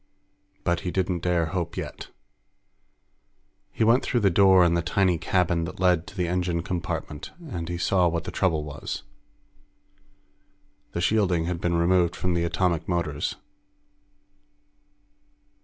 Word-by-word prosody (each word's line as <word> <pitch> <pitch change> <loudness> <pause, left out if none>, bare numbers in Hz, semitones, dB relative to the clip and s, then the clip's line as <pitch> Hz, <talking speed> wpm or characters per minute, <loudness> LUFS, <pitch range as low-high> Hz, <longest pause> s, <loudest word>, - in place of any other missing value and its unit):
But 85 -1 +1
he 90 - -4
didn't 90 -1 -1
dare 85 -2 +1
hope 90 -4 -3
yet. - - -6 1.6
He - - 0
went 115 +4 +5
through 120 - 0
the 100 -2 +4
door 95 0 +6
in 85 - +3
the 85 - +2
tiny 90 0 +1
cabin 85 -1 +1
that - - -8
led 90 -2 +2
to 105 0 -12
the 90 -1 0
engine 90 -1 -1
compartment, 85 -4 -4 0.2
and 85 -2 -4
he 85 - -3
saw 90 +1 +2
what 85 0 -1
the 90 - -6
trouble 85 -4 +1
was. 75 -2 -6 1.9
The 85 - -2
shielding 90 -4 +2
had 85 -1 -3
been 85 -1 0
removed 85 0 +2
from 90 +1 -1
the 85 0 +1
atomic 85 -1 0
motors. 85 -5 -1
85 Hz, 140 wpm, -25 LUFS, 85-90 Hz, 1.9 s, door